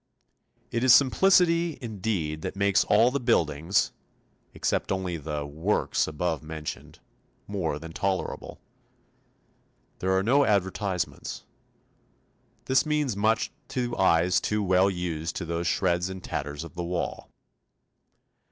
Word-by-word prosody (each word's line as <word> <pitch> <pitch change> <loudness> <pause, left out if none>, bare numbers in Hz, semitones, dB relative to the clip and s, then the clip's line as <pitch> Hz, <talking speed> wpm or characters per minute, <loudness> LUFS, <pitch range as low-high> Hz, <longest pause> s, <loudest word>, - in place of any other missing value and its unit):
It 115 +1 -1
is 130 -2 +8
simplicity, 170 +3 +4
indeed, 95 - -3
that - - -4
makes 100 0 +3
all 115 +4 +4
the 140 - -1
buildings 85 - +1 0.6
(except - - -1
only 95 -2 -1
the 75 -1 -4
'works' 80 +8 0
above 80 +2 -2
mentioned) 80 -1 -7 0.5
more 90 -7 -2
than 80 +2 -9
tolerable. 95 0 -3 1.4
There 95 +1 +1
are 95 - +1
no 135 +7 +4
advertisements. 95 - -1 1.2
This 130 0 +3
means 150 -7 0
much 110 +2 +1 0.2
to 125 -3 -2
eyes 90 -1 +3
too 105 0 0
well 95 0 +4
used 85 -4 -3
to 90 - -4
those 85 +1 -2
shreds 90 0 +1
and 95 -1 -8
tatters 75 +2 -4
of 85 - -10
the 85 0 -4
wall. 85 0 -3
95 Hz, 125 wpm, -27 LUFS, 85-110 Hz, 1.4 s, is